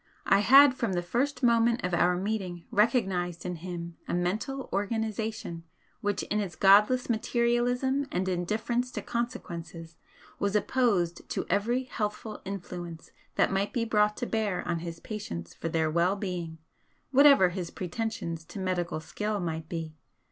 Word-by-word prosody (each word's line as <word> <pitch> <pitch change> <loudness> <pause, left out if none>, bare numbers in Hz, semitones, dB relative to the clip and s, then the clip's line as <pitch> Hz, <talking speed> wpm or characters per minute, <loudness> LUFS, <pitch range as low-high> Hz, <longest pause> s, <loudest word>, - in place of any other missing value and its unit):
I 195 - +5
had 270 +5 +8
from 235 -6 -2
the 175 -1 -1
first 270 +10 -1
moment 235 0 +3
of 180 0 -1
our 175 +1 +3
meeting 190 -3 -3
recognised 190 -7 +1
in 180 -1 -3
him 170 -1 -6
a - - -1
mental 210 +10 -2
organisation 215 -3 -2 0.4
which 205 -2 -1
in 210 - -1
its 190 -5 -3
godless 210 +8 +5
materialism 245 +4 +1
and 185 +1 -1
indifference 215 +7 -1
to - - -4
consequences, 170 -8 -5 0.4
was 200 0 0
opposed 205 -7 +1
to - - -2
every 235 +6 +1
healthful 215 -3 -4
influence 175 -4 -7 0.2
that - - +2
might 195 +1 0
be 235 -3 0
brought 210 -1 +2
to - - -2
bear 215 -5 -1
on 170 -1 0
his 165 0 -6
patients 85 - -6
for 165 - -4
their 160 -1 +1
well 170 +4 +2
being, 180 -5 -4 0.5
whatever 275 -8 +7
his 175 -1 -4
pretensions 180 -3 -4
to - - -10
medical 180 -4 -1
skill 210 +5 -3
might 160 -3 -4
be. 165 -2 -4
200 Hz, 150 wpm, -29 LUFS, 175-230 Hz, 0.5 s, had